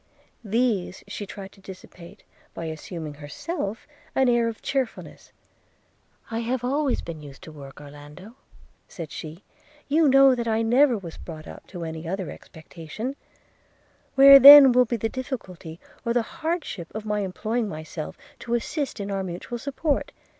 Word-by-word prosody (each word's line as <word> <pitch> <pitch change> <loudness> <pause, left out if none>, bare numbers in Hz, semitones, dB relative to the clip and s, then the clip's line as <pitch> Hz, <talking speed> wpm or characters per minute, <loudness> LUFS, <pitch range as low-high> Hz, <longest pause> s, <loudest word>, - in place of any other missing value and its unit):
These 215 -4 -1
she 205 - -6
tried 195 -1 -9
to 195 - -20
dissipate, 185 -2 -13 0.3
by 165 - -5
assuming 160 0 -7
herself 195 - -6 0.3
an 265 -1 +3
air 240 -1 +2
of 225 -1 -5
cheerfulness 270 -4 -4 0.5
– - - -30
'I 225 - -2
have 240 +1 -2
always 275 +1 0
been 165 -2 -8
used 140 -2 -12
to 160 - -10
work, 140 -3 -12
Orlando,' 145 +8 -12 0.5
said 165 -4 -8
she 160 +4 -9 0.2
– 300 0 -29
'you 310 +2 +4
know 270 0 +6
that 235 -2 -3
I 225 0 +1
never 245 +2 +4
was 170 -5 -9
brought 155 -2 -10
up - - -12
to 175 -3 -8
any 160 0 -6
other 190 0 -4
expectation 165 - -8 0.5
– - - -38
Where 275 0 +10
then 280 -1 +11
will 250 +1 +4
be 235 +1 -2
the 225 - -1
difficulty 190 - -7 0.2
or 235 - -1
the 240 -1 +1
hardship 315 - -4
of 215 0 -5
my 210 -1 -1
employing 215 +4 -2
myself 155 -1 -7 0.2
to 235 0 -2
assist 270 +2 -3
in 200 0 -4
our 195 -1 -2
mutual 185 +6 -6
support? 285 +3 -2
215 Hz, 165 wpm, -24 LUFS, 170-255 Hz, 0.5 s, then